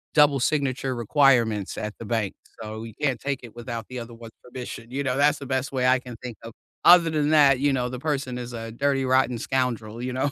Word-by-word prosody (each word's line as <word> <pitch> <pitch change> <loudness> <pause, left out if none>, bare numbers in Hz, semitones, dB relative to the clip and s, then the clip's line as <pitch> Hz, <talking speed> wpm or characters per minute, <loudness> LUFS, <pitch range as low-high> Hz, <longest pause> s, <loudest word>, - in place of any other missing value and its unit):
double 145 -2 +5
signature 135 -2 0
requirements 120 -4 +2
at 105 0 -4
the 115 - -7
bank, 110 -3 -1 0.3
so 110 0 -6
you 115 -2 -9
can't 135 -6 0
take 140 -1 -2
it 115 -1 -12
without 115 -2 -6
the 125 -1 -5
other 115 0 -8
one's 115 -1 -12
permission," 125 -2 -8
you 140 +3 -3
know, 130 -1 0
that's 145 +1 +3
the 140 - -8
best 130 +1 -2
way 130 -1 0
I 130 0 +4
can 125 -2 -10
think 125 -2 -8
of. 115 - -8 0.3
Other 170 -2 +7
than 150 -1 +1
that, 140 -4 +5
you 145 0 +2
know, 125 -1 -1
the 125 0 -6
person 135 -4 -2
is 120 0 -7
a 115 -1 -6
dirty 135 +2 0
rotten 130 -2 +2
scoundrel, 120 -3 -2
you 125 0 -3
know. 135 +2 0
125 Hz, 235 wpm, -25 LUFS, 115-140 Hz, 0.3 s, Other